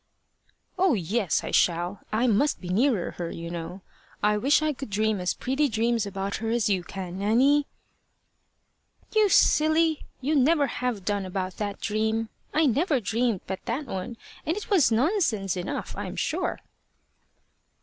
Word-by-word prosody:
"Oh, 370 Hz, -7 st, +4 dB
yes! 195 Hz, 0 st, 0 dB
I -, -, -4 dB
shall. 175 Hz, +3 st, +1 dB
I 220 Hz, +3 st, +1 dB
must 250 Hz, +5 st, +2 dB
be 180 Hz, -, -8 dB
nearer 220 Hz, 0 st, +1 dB
her, 170 Hz, -1 st, -2 dB
you 170 Hz, 0 st, -6 dB
know. 175 Hz, +2 st, -6 dB, 0.4 s
I 210 Hz, 0 st, +4 dB
wish 275 Hz, +8 st, +3 dB
I 305 Hz, -1 st, +1 dB
could 270 Hz, -2 st, -8 dB
dream 215 Hz, +1 st, 0 dB
as 180 Hz, 0 st, -1 dB
pretty 270 Hz, +3 st, 0 dB
dreams 225 Hz, -1 st, 0 dB
about 195 Hz, 0 st, -3 dB
her 225 Hz, 0 st, -3 dB
as 235 Hz, -1 st, +1 dB
you 190 Hz, -3 st, +1 dB
can, 185 Hz, 0 st, -6 dB
Nanny." 265 Hz, +8 st, +3 dB, 1.5 s
"You 430 Hz, -2 st, +5 dB
silly! 315 Hz, -2 st, +3 dB
you 290 Hz, +4 st, 0 dB
never 290 Hz, +2 st, +4 dB
have 245 Hz, -6 st, -3 dB
done 205 Hz, -1 st, 0 dB
about 185 Hz, 0 st, -4 dB
that 205 Hz, -1 st, -3 dB
dream. 220 Hz, +1 st, -1 dB, 0.2 s
I 315 Hz, +1 st, +3 dB
never 285 Hz, -, +2 dB
dreamed 225 Hz, -1 st, 0 dB
but 190 Hz, 0 st, -5 dB
that 250 Hz, +5 st, -2 dB
one, 225 Hz, +1 st, -5 dB, 0.3 s
and 325 Hz, +5 st, -1 dB
it 425 Hz, -, -7 dB
was 340 Hz, -, +4 dB
nonsense 225 Hz, -, +1 dB
enough, 180 Hz, -1 st, -4 dB
I'm -, -, -5 dB
sure." -, -, -2 dB
225 Hz, 160 wpm, -26 LUFS, 195-280 Hz, 1.5 s, You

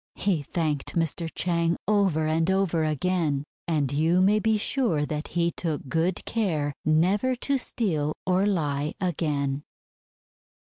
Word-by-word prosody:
He 185 Hz, -6 st, 0 dB
thanked 150 Hz, -1 st, -2 dB
Mr. 165 Hz, 0 st, -1 dB
Chang 170 Hz, -1 st, +1 dB
over 195 Hz, -7 st, +2 dB
and 160 Hz, +2 st, +1 dB
over 190 Hz, -4 st, +1 dB
again; 155 Hz, -1 st, 0 dB, 0.2 s
and 150 Hz, -5 st, 0 dB
you 160 Hz, +5 st, +2 dB
may 200 Hz, +3 st, +4 dB
be 220 Hz, 0 st, +2 dB
sure 210 Hz, -, +1 dB
that 150 Hz, +1 st, -4 dB
he 170 Hz, 0 st, +2 dB
took 155 Hz, -5 st, -3 dB
good 165 Hz, +5 st, 0 dB
care 160 Hz, -11 st, -1 dB
never 190 Hz, +11 st, +2 dB
to 275 Hz, +2 st, 0 dB
steal 155 Hz, -12 st, -1 dB
or 185 Hz, +2 st, +2 dB
lie 150 Hz, -6 st, -1 dB
again. 145 Hz, -5 st, -1 dB
165 Hz, 135 wpm, -26 LUFS, 150-190 Hz, 0.2 s, may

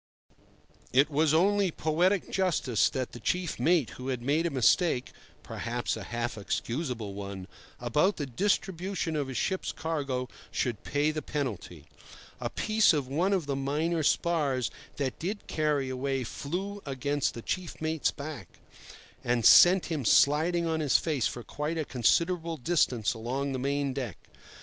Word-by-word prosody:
It 140 Hz, +4 st, +4 dB
was 150 Hz, +1 st, +3 dB
only 195 Hz, +4 st, +3 dB
poetic 175 Hz, +5 st, +1 dB
justice 165 Hz, -, +2 dB
that 130 Hz, -2 st, -3 dB
the 120 Hz, -, -9 dB
chief 175 Hz, +7 st, -1 dB
mate 165 Hz, -7 st, +2 dB
who 125 Hz, -, -8 dB
had 125 Hz, -3 st, -2 dB
made 155 Hz, +6 st, +1 dB
a -, -, -1 dB
mistake—perhaps 125 Hz, -4 st, -1 dB
a -, -, -7 dB
half 120 Hz, -2 st, -3 dB
excusable 115 Hz, 0 st, -3 dB
one—about 100 Hz, -, -2 dB
the 145 Hz, -, -2 dB
distribution 185 Hz, -, -1 dB
of 145 Hz, -3 st, -1 dB
his 130 Hz, -2 st, -5 dB
ship's 190 Hz, +7 st, -1 dB
cargo 140 Hz, -6 st, -3 dB, 0.2 s
should 120 Hz, -5 st, -2 dB
pay 145 Hz, +2 st, +1 dB
the 155 Hz, 0 st, -3 dB
penalty. 105 Hz, -, -4 dB, 0.5 s
A -, -, -2 dB
piece 215 Hz, -3 st, +3 dB
of 145 Hz, -4 st, -1 dB
one 165 Hz, +9 st, 0 dB
of 190 Hz, -6 st, +1 dB
the 140 Hz, -1 st, -2 dB
minor 150 Hz, +5 st, 0 dB
spars 145 Hz, -6 st, +1 dB, 0.3 s
that 135 Hz, -3 st, -2 dB
did 200 Hz, +5 st, -4 dB
carry 150 Hz, -3 st, 0 dB
away 130 Hz, 0 st, -2 dB
flew 185 Hz, -, -5 dB
against 140 Hz, +1 st, -1 dB
the 115 Hz, -, -7 dB
chief 185 Hz, -2 st, -4 dB
mate's 160 Hz, -1 st, 0 dB
back, 140 Hz, -, -8 dB, 0.7 s
and 120 Hz, -2 st, 0 dB
sent 180 Hz, +1 st, +8 dB
him 150 Hz, -4 st, -1 dB
sliding 160 Hz, +8 st, +4 dB
on 160 Hz, -1 st, 0 dB
his 150 Hz, -4 st, +4 dB
face 150 Hz, -8 st, 0 dB
for 120 Hz, -, -6 dB
quite 150 Hz, +6 st, -4 dB
a 155 Hz, -, -1 dB
considerable 165 Hz, +7 st, +1 dB
distance 125 Hz, -8 st, +1 dB
along 130 Hz, +5 st, -3 dB
the 130 Hz, -, -2 dB
main 140 Hz, +1 st, -1 dB
deck. 125 Hz, -8 st, -4 dB
145 Hz, 150 wpm, -29 LUFS, 125-165 Hz, 0.7 s, sent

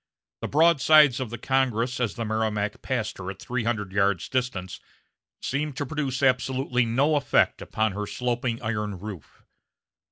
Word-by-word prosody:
The -, -, -2 dB
broadsides 155 Hz, -3 st, +5 dB
of 130 Hz, -3 st, -3 dB
the 120 Hz, -, -6 dB
Congress, 125 Hz, -2 st, 0 dB
as 120 Hz, -4 st, -1 dB
the 115 Hz, -, -3 dB
Merrimac 105 Hz, -1 st, -1 dB
passed 115 Hz, -7 st, -3 dB
her 95 Hz, 0 st, -5 dB
at 95 Hz, 0 st, -7 dB
three 120 Hz, +1 st, -3 dB
hundred 105 Hz, -5 st, -1 dB
yards' 100 Hz, -2 st, +1 dB
distance, 110 Hz, -8 st, -2 dB, 0.6 s
seemed 140 Hz, 0 st, -2 dB
to 145 Hz, -, -2 dB
produce 140 Hz, -2 st, -3 dB
absolutely 130 Hz, -1 st, +2 dB
no 135 Hz, +7 st, +2 dB
effect 140 Hz, -, +2 dB
upon 110 Hz, -1 st, -1 dB
her 105 Hz, +2 st, -4 dB
sloping 120 Hz, 0 st, -2 dB
iron 105 Hz, -3 st, -2 dB
roof. 100 Hz, -4 st, -10 dB
120 Hz, 155 wpm, -26 LUFS, 105-130 Hz, 0.6 s, broadsides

